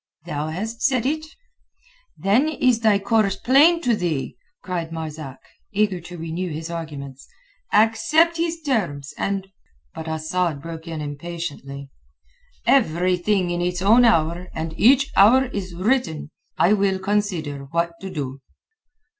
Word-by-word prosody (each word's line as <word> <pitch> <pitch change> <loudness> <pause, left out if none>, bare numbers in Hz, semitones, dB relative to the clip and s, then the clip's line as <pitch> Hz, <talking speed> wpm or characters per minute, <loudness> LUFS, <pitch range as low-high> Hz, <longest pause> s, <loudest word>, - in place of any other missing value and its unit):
"Thou 150 -3 -3
hast 215 +9 -5
said 255 -4 +2
it." 310 +3 -1 0.9
"Then 230 +11 +2
is 255 -6 +2
thy 215 -3 +4
course 200 -1 +1
plain 295 - +4
to 240 -2 +3
thee!" 160 -10 -2 0.3
cried 170 -3 -4
Marzak, 155 -4 -6 0.4
eager 200 -3 +1
to 175 +1 -10
renew 165 +3 -4
his 160 +2 -5
arguments. 140 -5 -7 0.4
"Accept 225 +11 +3
his 330 0 -2
terms, 175 - -2
and...." 195 -1 -2 0.4
But 160 - -7
Asad 160 0 -1
broke 165 +2 -8
in 160 -2 -5
impatiently. 145 -3 -6 0.7
"Every 180 -7 +3
thing 180 0 0
in 175 0 -1
its 180 +1 -1
own 225 +5 +6
hour 170 -5 +2
and 160 0 -4
each 270 +7 +4
hour 240 +7 +6
is 190 -8 -5
written. 185 - 0 0.3
I 185 - +4
will 195 -2 +2
consider 190 -8 -2
what 170 +4 -1
to 195 - -6
do." 140 -6 -5
180 Hz, 140 wpm, -22 LUFS, 160-220 Hz, 0.9 s, own